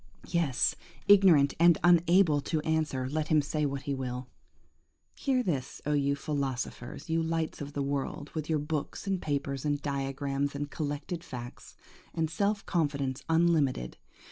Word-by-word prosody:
Yes! 160 Hz, -7 st, +2 dB, 0.3 s
ignorant 185 Hz, -9 st, +6 dB
and 170 Hz, -1 st, +6 dB
unable 175 Hz, -2 st, +5 dB
to 160 Hz, +2 st, -1 dB
answer, 155 Hz, -5 st, 0 dB
let 155 Hz, +3 st, -2 dB
him 155 Hz, -, +4 dB
say 150 Hz, +1 st, 0 dB
what 140 Hz, 0 st, -4 dB
he 140 Hz, -1 st, -2 dB
will. 130 Hz, -1 st, -4 dB, 0.9 s
Hear 260 Hz, -3 st, 0 dB
this, 145 Hz, -, -2 dB
oh 150 Hz, -, +1 dB
you 140 Hz, -1 st, +2 dB
philosophers,–you 140 Hz, +2 st, -3 dB
lights 165 Hz, -1 st, -2 dB
of 145 Hz, 0 st, -6 dB
the 145 Hz, -, -1 dB
world, 140 Hz, +1 st, -3 dB
with 155 Hz, -1 st, -4 dB
your 160 Hz, -, +2 dB
books 150 Hz, +3 st, -3 dB
and 195 Hz, -2 st, -1 dB
papers 140 Hz, -2 st, -2 dB
and 145 Hz, -1 st, 0 dB
diagrams, 140 Hz, 0 st, -2 dB
and 145 Hz, 0 st, -4 dB
collected 155 Hz, +3 st, -4 dB
facts, 120 Hz, -6 st, -9 dB, 0.4 s
and 160 Hz, -1 st, 0 dB
self 200 Hz, +4 st, 0 dB
confidence 140 Hz, -6 st, -1 dB
unlimited! 160 Hz, -, +2 dB
145 Hz, 145 wpm, -30 LUFS, 140-165 Hz, 0.9 s, ignorant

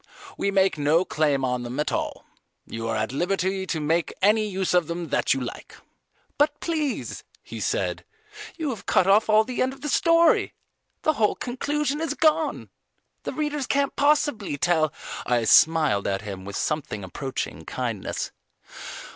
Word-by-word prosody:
We 200 Hz, -, -1 dB
make 195 Hz, -4 st, +2 dB
no 155 Hz, +5 st, +3 dB
claim 145 Hz, -5 st, +1 dB
on 125 Hz, -1 st, -1 dB
them 120 Hz, +3 st, -5 dB
at 150 Hz, -, 0 dB
all. -, -, -3 dB, 0.4 s
You 115 Hz, 0 st, -5 dB
are 115 Hz, -, -1 dB
at 110 Hz, +1 st, -1 dB
liberty 190 Hz, +5 st, -1 dB
to 160 Hz, -, -1 dB
make 160 Hz, +3 st, 0 dB
any 215 Hz, +2 st, +3 dB
use 190 Hz, -2 st, -1 dB
of 175 Hz, -3 st, +3 dB
them 170 Hz, -1 st, -4 dB
that -, -, +2 dB
you -, -, -2 dB
like." 125 Hz, -, -7 dB, 0.6 s
"But 295 Hz, 0 st, +2 dB
please," 310 Hz, -5 st, -2 dB, 0.2 s
he -, -, -8 dB
said, -, -, -1 dB, 0.5 s
"you 315 Hz, -5 st, -2 dB
have 225 Hz, -, -8 dB
cut -, -, +4 dB
off 205 Hz, +3 st, +4 dB
all 215 Hz, 0 st, +6 dB
the 250 Hz, +2 st, -3 dB
end 260 Hz, +1 st, +1 dB
of 270 Hz, -, -15 dB
the 295 Hz, -, -3 dB
story: 335 Hz, +2 st, +3 dB, 0.5 s
the 310 Hz, -, +3 dB
whole 215 Hz, -7 st, +2 dB
conclusion 290 Hz, +4 st, -2 dB
is 325 Hz, -, -2 dB
gone. 315 Hz, 0 st, +1 dB, 0.5 s
The -, -, -3 dB
readers 295 Hz, -3 st, -2 dB
can't 280 Hz, 0 st, +1 dB
possibly 285 Hz, -, +1 dB
tell, 155 Hz, -1 st, +2 dB, 0.2 s
" -, -, -5 dB
I 120 Hz, -2 st, +2 dB
smiled 155 Hz, -4 st, +4 dB
at 95 Hz, +1 st, -1 dB
him 95 Hz, -3 st, -7 dB
with 100 Hz, 0 st, -6 dB
something 145 Hz, -9 st, -2 dB
approaching 130 Hz, +9 st, -5 dB
kindness. -, -, -4 dB
190 Hz, 170 wpm, -25 LUFS, -, 0.6 s, all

